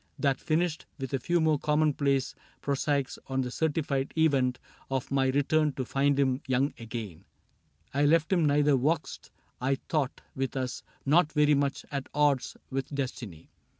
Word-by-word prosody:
That 140 Hz, -2 st, +1 dB
finished 160 Hz, 0 st, -1 dB
— -, -, -42 dB
with 135 Hz, -3 st, -5 dB
a 135 Hz, -, +1 dB
few 175 Hz, +7 st, +1 dB
more 155 Hz, -2 st, +2 dB
commonplace 145 Hz, -3 st, +1 dB, 0.3 s
Prosaics 140 Hz, -1 st, -1 dB
on 135 Hz, 0 st, 0 dB
the 125 Hz, -1 st, -3 dB
certified 145 Hz, -2 st, -1 dB
event 135 Hz, -6 st, +3 dB, 0.3 s
Of 135 Hz, -1 st, -2 dB
my 135 Hz, -1 st, +2 dB
return 145 Hz, +2 st, +2 dB
to 130 Hz, -, -3 dB
find 140 Hz, +2 st, +1 dB
him 135 Hz, -1 st, +2 dB
young 130 Hz, +2 st, +1 dB
again 115 Hz, -7 st, -6 dB, 0.4 s
— 80 Hz, -1 st, -38 dB
I 145 Hz, +2 st, +2 dB
left 160 Hz, +4 st, +3 dB
him 175 Hz, -3 st, +3 dB
neither 145 Hz, 0 st, +4 dB
vexed, 150 Hz, +5 st, -1 dB, 0.3 s
I 135 Hz, +2 st, +2 dB
thought, 140 Hz, -1 st, -2 dB
with 135 Hz, +1 st, -2 dB
us, 130 Hz, -1 st, -3 dB, 0.2 s
Nor 155 Hz, +5 st, +5 dB
very 150 Hz, 0 st, +3 dB
much 140 Hz, -1 st, 0 dB
at 140 Hz, -2 st, -4 dB
odds 145 Hz, -3 st, +2 dB
with 135 Hz, 0 st, -2 dB
destiny. 125 Hz, -, -5 dB
140 Hz, 165 wpm, -29 LUFS, 130-150 Hz, 0.4 s, Nor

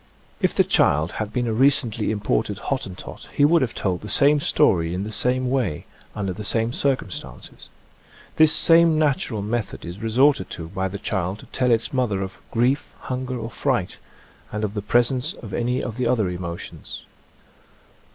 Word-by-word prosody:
If -, -, +1 dB
the -, -, +5 dB
child 75 Hz, +4 st, +2 dB
had 105 Hz, -1 st, -3 dB
been 125 Hz, -1 st, -1 dB
a 115 Hz, -, -1 dB
recently 125 Hz, -3 st, +2 dB
imported 105 Hz, -1 st, -1 dB
Hottentot 105 Hz, -8 st, -5 dB
he 145 Hz, -, +5 dB
would 165 Hz, +2 st, +4 dB
have 125 Hz, -3 st, -1 dB
told 90 Hz, -3 st, -1 dB
the 105 Hz, -, -8 dB
same 145 Hz, +1 st, +4 dB
story 85 Hz, -10 st, +2 dB
in 95 Hz, -, -2 dB
the 110 Hz, -, -5 dB
same 125 Hz, +4 st, +1 dB
way, 120 Hz, -, -1 dB, 0.3 s
under 100 Hz, -3 st, -2 dB
the 105 Hz, -, -7 dB
same 115 Hz, +3 st, +1 dB
circumstances. 130 Hz, -10 st, -3 dB, 0.7 s
This 155 Hz, -1 st, +6 dB
same 165 Hz, -1 st, +6 dB
natural 135 Hz, -8 st, 0 dB
method 110 Hz, 0 st, -3 dB
is 85 Hz, +3 st, -8 dB
resorted 130 Hz, +5 st, +2 dB
to 80 Hz, -1 st, -7 dB
by 95 Hz, +2 st, -2 dB
the 95 Hz, +1 st, -5 dB
child 95 Hz, -2 st, -2 dB
to -, -, -13 dB
tell 125 Hz, -1 st, 0 dB
its 115 Hz, +2 st, +2 dB
mother 110 Hz, -7 st, 0 dB
of 95 Hz, 0 st, -8 dB
grief, 125 Hz, +4 st, 0 dB
hunger 130 Hz, 0 st, -4 dB
or 115 Hz, 0 st, -6 dB
fright, -, -, -1 dB, 0.5 s
and 105 Hz, +1 st, -3 dB
of 105 Hz, -1 st, -2 dB
the 105 Hz, -, -3 dB
pres 120 Hz, +4 st, +3 dB
ence 125 Hz, -1 st, -1 dB
of 105 Hz, -5 st, -10 dB
any 120 Hz, +3 st, -1 dB
of 115 Hz, -1 st, -5 dB
the 125 Hz, -2 st, 0 dB
other 115 Hz, -6 st, +1 dB
emotions. 85 Hz, -1 st, -7 dB
115 Hz, 180 wpm, -23 LUFS, 100-130 Hz, 0.7 s, This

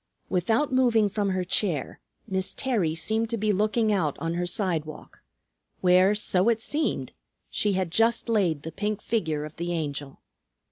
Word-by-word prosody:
Without 220 Hz, -, +1 dB
moving 235 Hz, -5 st, +4 dB
from 200 Hz, 0 st, -1 dB
her 185 Hz, -1 st, 0 dB
chair 180 Hz, -5 st, -1 dB, 0.3 s
Miss 190 Hz, -1 st, -2 dB
Terry 205 Hz, -12 st, 0 dB
seemed 220 Hz, +6 st, 0 dB
to 230 Hz, -, -1 dB
be 210 Hz, 0 st, +1 dB
looking 215 Hz, +2 st, +2 dB
out 160 Hz, -8 st, 0 dB
on 165 Hz, 0 st, -2 dB
her 175 Hz, +1 st, -1 dB
sidewalk, 165 Hz, -5 st, -3 dB, 0.6 s
where, 185 Hz, +2 st, +5 dB
so 200 Hz, 0 st, +2 dB
it 225 Hz, -1 st, +2 dB
seemed, 300 Hz, +7 st, -2 dB, 0.4 s
she 205 Hz, -1 st, +1 dB
had 185 Hz, -3 st, -1 dB
just 225 Hz, +5 st, +2 dB
laid 180 Hz, -10 st, +1 dB
the 160 Hz, -, -6 dB
pink 210 Hz, +2 st, -2 dB
figure 160 Hz, -11 st, -1 dB
of 155 Hz, -, -10 dB
the 175 Hz, +1 st, -3 dB
Angel. 145 Hz, -4 st, -4 dB
190 Hz, 160 wpm, -26 LUFS, 170-220 Hz, 0.6 s, where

